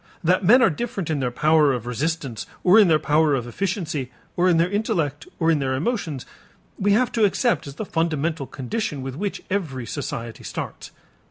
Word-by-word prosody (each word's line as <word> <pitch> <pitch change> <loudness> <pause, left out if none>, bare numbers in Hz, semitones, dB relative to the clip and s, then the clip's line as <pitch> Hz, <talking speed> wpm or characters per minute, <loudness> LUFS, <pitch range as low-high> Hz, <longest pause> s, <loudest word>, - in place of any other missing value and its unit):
That 180 +4 +3
men 240 +8 +6
are - - +5
different 195 -2 -3
in 150 - 0
their 130 -2 0
power 150 +2 +3
of 120 -2 -4
resistance 135 -1 -3 0.2
or 185 +4 +7
in 210 - +7
their 160 -2 +5
power 150 0 +2
of 125 -3 -2
efficiency 160 - -3 0.3
or 180 +1 +3
in 170 - +4
their 165 +1 +3
intellect 170 -8 -1
or 165 0 +3
in 155 - +2
their 130 -1 0
emotions, 160 - -2 0.5
we 200 +1 +3
have 245 +4 +2
to 225 - +1
accept 215 - +2
as 140 - -8
the 215 - -4
fundamental 160 -4 -1
condition 135 - -4
with 135 0 -5
which 200 +8 -4
every 150 -11 -2
society 120 -3 -5
starts. - - -6
160 Hz, 190 wpm, -23 LUFS, 135-190 Hz, 0.5 s, or